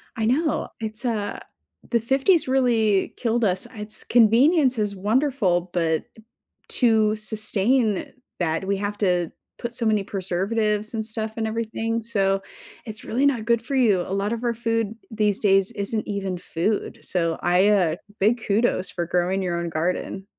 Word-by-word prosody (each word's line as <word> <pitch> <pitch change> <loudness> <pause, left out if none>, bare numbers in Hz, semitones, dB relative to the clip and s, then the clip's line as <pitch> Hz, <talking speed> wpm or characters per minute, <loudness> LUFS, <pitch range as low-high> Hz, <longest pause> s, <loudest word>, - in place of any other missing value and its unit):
I 220 - -1
know, 290 +7 +1
it's 220 +1 -4
uh, 215 -4 -2 0.5
the 235 - +3
50s 270 - +2
really 230 -6 +2
killed 235 -1 0
us, 190 +3 0
it's 210 0 -4
convenience 255 +4 +4
is 205 -1 -1
wonderful 205 -4 +1
but, 160 -2 +1 0.7
to 220 -3 +3
sustain 215 +1 0 0.3
that 170 +1 -1
we 200 0 +1
have 205 +1 -3
to 180 -4 +1 0.3
put 235 0 -5
so 235 -2 -2
many 215 -2 +2
preservatives 205 +3 -1
and 220 -1 -2
stuff 220 0 -5
in 220 - -1
everything, 225 +1 -2
so 195 -3 0 0.4
it's 215 -1 -8
really 255 +5 0
not 250 -6 +1
good 235 -1 +2
for 260 +4 -4
you. 220 -8 +3
A 185 - -5
lot 200 +3 0
of 235 +1 -5
our 235 - +1
food 225 -2 -1 0.2
these 210 -2 +1
days 195 0 +3
isn't 215 +1 -1
even 195 -3 -3
food, 180 +5 -2
so 165 -3 0
I, 180 +3 +4
uh, 180 -6 +3 0.2
big 225 +4 +2
kudos 205 -2 +1
for 175 - -3
growing 180 +3 0
your 175 -2 -1
own 170 0 -3
garden. 180 +4 -2
215 Hz, 160 wpm, -24 LUFS, 195-230 Hz, 0.7 s, convenience